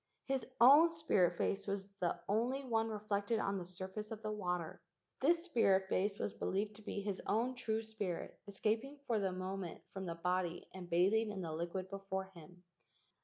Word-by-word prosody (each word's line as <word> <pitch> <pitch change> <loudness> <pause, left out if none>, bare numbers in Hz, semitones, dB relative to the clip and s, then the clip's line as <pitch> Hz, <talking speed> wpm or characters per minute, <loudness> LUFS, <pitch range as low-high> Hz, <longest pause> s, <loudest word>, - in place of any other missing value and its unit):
His 270 -1 -1
own 285 +8 +9
spirit 200 - +2
face 200 +1 0
was 195 -1 -2
the 175 -2 0
only 240 +7 +1
one 225 -2 +1
reflected 210 0 0
on 195 -2 0
the 175 - -6
surface 190 +4 -6
of 225 -1 -7
the 215 - -1
water. 180 -5 -2 0.4
This 335 +5 +3
spirit 195 - +3
face 200 +2 +1
was 205 - -2
be¬ - - -3
lieved 205 +2 0
to - - -13
be 205 -1 -4
his 200 -1 -2
own 235 +4 +2
true 225 -3 -1
spirit 210 -5 -4
escaping 220 +8 -1
for 230 -3 +1
the 195 -2 0
moment 185 -1 -4
from 190 -1 -4
the 170 - -3
body 180 0 -1
and 180 -2 -8
bathing 200 +6 +3
in 200 -2 -4
the 165 - -3
liquid 175 +3 -3
before 190 -1 -4
him. 175 +1 -14
200 Hz, 185 wpm, -37 LUFS, 185-225 Hz, 0.4 s, own